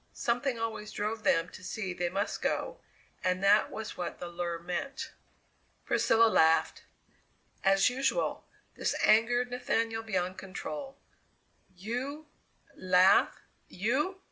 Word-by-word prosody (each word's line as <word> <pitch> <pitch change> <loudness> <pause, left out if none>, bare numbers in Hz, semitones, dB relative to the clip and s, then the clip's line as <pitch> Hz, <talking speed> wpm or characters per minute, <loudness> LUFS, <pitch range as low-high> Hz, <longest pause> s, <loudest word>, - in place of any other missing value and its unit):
Something 245 +1 -1
always 225 -2 -4
drove 215 +2 -3
them 165 +1 +2
to 185 - -12
see 190 -1 -4
they 175 -1 -1
must 195 +3 -2
go, - - -2 0.4
and 185 +1 0
that 205 +2 +5
was 220 -1 -6
what 175 - -4
the - - -7
lure 175 0 -3
meant. 180 +11 -5 0.7
Priscilla 230 0 +4
laughed. 160 -6 +3 0.8
As 195 0 +4
usual, 270 - -1 0.3
this - - -1
angered 240 +3 +3
Nathaniel 230 -2 -1
beyond 185 -4 -2
control. 270 +9 -7 0.8
"You 250 - -4 0.5
laugh 185 +1 +4 0.3
you! 270 - -1
215 Hz, 115 wpm, -30 LUFS, 185-245 Hz, 0.8 s, that